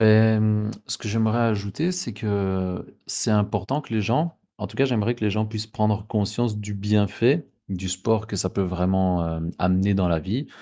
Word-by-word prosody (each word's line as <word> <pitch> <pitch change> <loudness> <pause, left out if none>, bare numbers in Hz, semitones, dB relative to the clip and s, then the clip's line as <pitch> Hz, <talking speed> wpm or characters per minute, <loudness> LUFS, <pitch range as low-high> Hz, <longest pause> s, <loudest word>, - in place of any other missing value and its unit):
Hem, 110 -1 +5 0.2
ce - - -3
que - - -7
j'aimerais 110 +1 +1
ajouter, 115 - 0
c'est 180 - -3
que 95 -3 -2
c'est - - 0
important 105 +5 +1
que 115 - -9
les 110 - +2
gens 150 - 0 0.2
en - - -3
tout - - -13
cas, 135 - +4
j'aimerais 120 -2 +1
que 110 - -3
les 105 - +2
gens 110 +2 0
puissent 110 0 -5
prendre 105 -1 0
conscience 105 +1 0
du 105 0 -5
bienfait 105 - +2 0.2
du 95 -1 -4
sport 110 +4 0
que 105 - -4
ça 95 -1 0
peut 100 - -1
vraiment, 90 -2 +1
hem, 80 +1 -4
amener 95 +3 +2
dans 95 -2 +2
la 85 -2 +2
vie. 110 - -3
105 Hz, 200 wpm, -24 LUFS, 95-110 Hz, 0.2 s, Hem